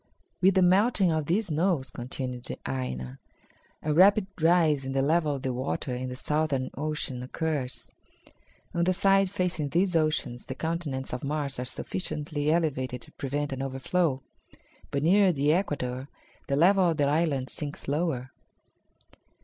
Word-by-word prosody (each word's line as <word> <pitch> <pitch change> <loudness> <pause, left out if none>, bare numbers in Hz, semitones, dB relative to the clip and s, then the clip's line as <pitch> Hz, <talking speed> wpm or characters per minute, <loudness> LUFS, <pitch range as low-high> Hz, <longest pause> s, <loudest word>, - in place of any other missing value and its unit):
"With 190 +1 +5
the 190 - +5
melting 190 +1 +4
of 155 -2 -1
these 205 +6 +1
snows," 160 -3 0
continued 125 0 -5 0.2
Aina, 65 -1 -4 0.6
"a 150 - 0
rapid 195 +5 +6 0.2
rise 160 -4 +4
in 135 0 -4
the 135 - +2
level 155 0 +2
of 135 - -7
the 130 - -1
water 130 +1 -2
in 130 +1 -3
the 125 - -5
southern 150 -1 -1
oceans 145 -4 -2
occurs. 145 -1 -3 0.8
On 170 - +1
the 185 +2 +3
side 195 0 +4
facing 180 -6 -1
these 180 +3 +1
oceans 155 -6 0
the 130 - -5
continents 155 -5 -3
of 125 - -4
Mars 140 -2 -2
are 125 - -2
sufficiently 150 +1 -3
elevated 130 -7 0
to - - -16
prevent 145 +1 -3
an 135 - -4
overflow, 135 +2 0 0.7
but 140 0 -1
nearer 190 +3 +5
the 145 -1 +2
equator 135 -7 -1 0.4
the 140 - +1
level 180 +4 +5
of 165 - -1
the 145 - +3
land 145 -3 +1
sinks 150 -1 -4
lower." 140 -4 -1
150 Hz, 155 wpm, -28 LUFS, 130-170 Hz, 0.8 s, rapid